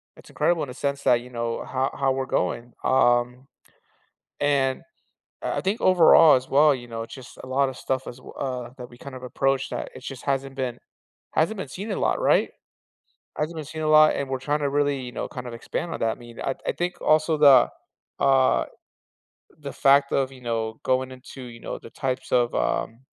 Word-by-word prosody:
It's - - -16
incredible 170 -2 +1
in 140 - -6
a - - -7
sense 140 +1 -3
that, 120 -1 +4
you 125 - -12
know, 115 -1 -3
ho 130 0 -1
how 135 -1 +1
we're 130 0 -1
going, 120 +3 -2
um, 125 0 +2 0.9
and 135 -2 +1 0.6
I - - -2
I - - +1
think 200 +4 -1
overall, 165 -4 +7
as 130 +1 -4
well, 145 +1 +5
you 120 -2 -8
know, 115 -1 -5
it's 115 - -9
just 130 -3 -12
a - - -9
lotta 130 0 0
stuff 130 +1 -3
as 120 - -7
w 130 - -13
uh, 125 -3 -4
that 125 -1 -8
we, 120 - -15
kind 140 0 -9
of 130 - -9
approach 135 +1 0
that - - -5
it 130 - -11
just 135 -2 -8
hasn't 135 -1 -2
been 125 -2 -3 0.5
hasn't 200 +8 +1
been 145 - -5
seen 200 +10 -7
a - - -1
lot, - - 0
right? - - +3 0.9
Hasn't 155 +2 -2
been 155 - -5
seen 155 +2 -6
a 155 - 0
lot, 155 0 +6
and 140 - -3
we're 130 -1 -2
trying 145 +2 -1
to 140 -1 0
really, 145 -1 +1
you 125 -1 -7
know, - - -4
kind 125 -1 -8
of 120 - -7
expand 165 +8 -5
on - - -5
that, 115 0 +1
I - - -20
mean, 120 -1 -11
I 135 - -2
I - - +1
think 175 +1 -3
also 155 +1 +3
the, 140 -3 +7 0.6
uh 135 -1 +4 1.0
the 140 -2 -7
fact 140 0 +4
of, 135 -1 +1
you 130 - -14
know, 115 -2 -3
going 130 0 0
into, 130 +1 -11
you 120 -1 -10
know, - - -6
the 115 - -13
types 130 -2 -4
of, 120 -1 +2
um 65 - -1
130 Hz, 220 wpm, -24 LUFS, 125-145 Hz, 1.0 s, overall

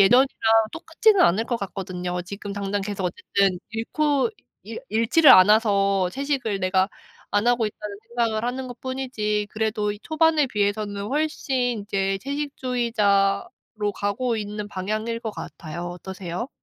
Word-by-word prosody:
예전이랑 245 +7 +6 0.5
똑같지는 400 +5 +2
않을 200 - +4
것 240 0 -1
같거든요. 180 -3 -4
지금 200 +2 -7
당장 200 0 -2
계속 200 -1 -4
어쨌든 185 +1 0
잃고 285 - 0 0.3
잃 465 - -7
잃지를 250 +8 +5
않아서 200 -1 +5
'채식을 265 -6 -2
내가 185 +1 +2 0.4
안 205 +2 +1
하고 240 -2 +3
있다.'는 210 -1 -7
생각을 230 -2 0
하는 255 +1 -3
것뿐이지 245 -5 -2
그래도 215 -1 -1
초반에 315 -2 +3
비해서는 205 -2 -1
훨씬 265 -5 -1
이제 195 -1 -1
채식주의자로 230 -7 -1
가고 225 +5 -1
있는 210 0 -5
방향일 215 +4 -3
것 225 -2 -4
같아요. 170 -1 -7
어떠세요? 185 +4 -6
215 Hz, 320 characters per minute, -24 LUFS, 200-250 Hz, 0.5 s, 예전이랑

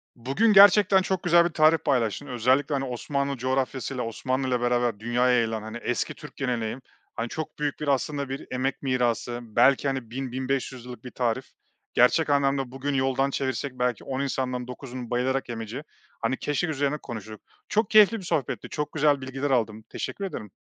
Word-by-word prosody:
Bugün 135 - +2
gerçekten 200 -1 +7
çok 190 -1 -2
güzel 170 0 +5
bir - - +1
tarif 155 +1 +4
paylaştın. 130 -1 0
Özellikle, 130 +4 +1
hani, 135 -1 -1
Osmanlı 140 +2 -2
coğrafyasıyla 130 0 -2
Osmanlı'yla 130 +2 -1
beraber 120 -3 +1
dünyaya 120 +2 +2
yayılan, 115 -2 0
hani, 110 +2 -7
eski 120 +1 -2
Türk 150 - -12
geleneği, 120 -4 -2 0.4
hani, 115 +1 -3
çok 155 +2 -6
büyük 145 -1 -2
bir 150 - -4
aslında 140 0 0
bir 135 +1 -6
emek 130 +2 -2
mirası 120 -2 0
belki, 130 +5 +3
hani, 130 -4 -3
1000-1500 130 -1 -3
yıllık 125 -2 -9
bir 125 - -8
tarif. 125 +1 -1 0.5
Gerçek 145 +6 +4
anlamda 135 -2 +1
bugün 135 +2 -3
yoldan 135 0 +1
çevirsek 130 -1 -3
belki 125 -1 0
10 135 0 -3
insandan 125 -2 -2
9'unun 125 -1 -7
bayılarak 130 +1 0
yemeyeceği, 115 +4 -5 0.4
hani, 130 - 0
keşkek 150 +3 -1
üzerine 145 0 0
konuştuk. 110 -5 -8 0.3
Çok 215 -1 +1
keyifli 215 +1 +6
bir - - -10
sohbetti 160 -7 -2
çok 150 -1 -4
güzel 145 -2 +3
bilgiler 135 +2 -3
aldım 110 -4 0
teşekkür 200 - -4
ederim. 105 - -6
130 Hz, 170 wpm, -26 LUFS, 120-145 Hz, 0.5 s, gerçekten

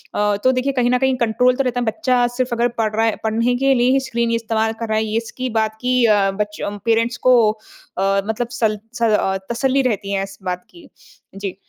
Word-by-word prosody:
अ, 210 0 +1
तो 255 - +5
देखिए 265 +2 -1
कहीं 245 -2 +1
न 250 - +3
कहीं 265 -1 +2
कंट्रोल 250 +2 +2
तो 275 - 0
रहता 245 0 -1
है। 245 - -1
बच्चा 250 +1 +1
सिर्फ़ 255 -2 -1
अगर 235 +1 +2
पढ़ 215 -1 0
रहा 225 +1 +2
है, 225 - +1
पढ़ने 230 +3 +1
के 270 +1 +3
लिए 245 +1 +3
ही 270 - +3
स्क्रीन 235 -2 -1
इस्तेमाल 225 -1 0
कर 230 - -2
रहा 215 - +1
है 220 0 -1
इसकी 255 +2 -4
बात 220 0 -1
की 250 -1 +2
अ, 200 -3 +3
बच 210 0 -4
अ, - - -2 0.2
पेरेंट्स 230 +1 +1
को 235 -4 +5
अ, 195 -2 -3
मतलब 225 +2 -2
सल 215 -3 0
स 240 - -9
अ, 210 -3 +2
तसल्ली 265 +3 +1
रहती 200 -2 -3
है 195 0 0
इस 195 - -9
बात 180 -1 -4
की। 345 - -16 0.5
जी। 195 -1 -5
230 Hz, 230 wpm, -19 LUFS, 215-250 Hz, 0.5 s, तो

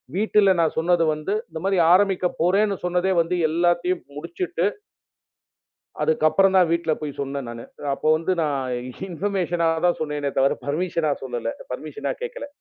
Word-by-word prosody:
வீட்டுல 205 -1 +4
நான் 160 - +1
சொன்னது 170 +1 +3
வந்து 155 +7 -3 0.2
இந்த 160 0 -6
மாரி 195 -1 +2 0.2
ஆரம்பிக்கப் 185 -2 +2
போறேன்னு 195 +3 +2
சொன்னதே 180 +2 +1
வந்து 175 +2 -1
எல்லாத்தையும் 175 +2 +1 0.2
முடிச்சிட்டு 170 +2 -3 1.4
அதுக்கப்புறம் 160 +5 +3
தான் 180 -3 +5
வீட்டுல 170 -1 +1
போய்ச் 150 -2 -6
சொன்னேன் 140 -2 -4
நானு. 115 0 -7 0.3
அப்போ 155 - -2
வந்து 165 +4 -1
நான் 135 -4 -1 0.4
இன்ஃபர்மேஷன் 175 -1 -1 0.2
தான் 175 - +1
சொன்னேனே 150 -2 -2
தவிர 135 +1 +4
பர்மிஷனா 165 0 0
சொல்லல 120 -3 -3 0.2
பர்மிஷனா 435 - -4
கேட்கல. 485 -6 -5
170 Hz, 140 wpm, -23 LUFS, 155-185 Hz, 1.4 s, தான்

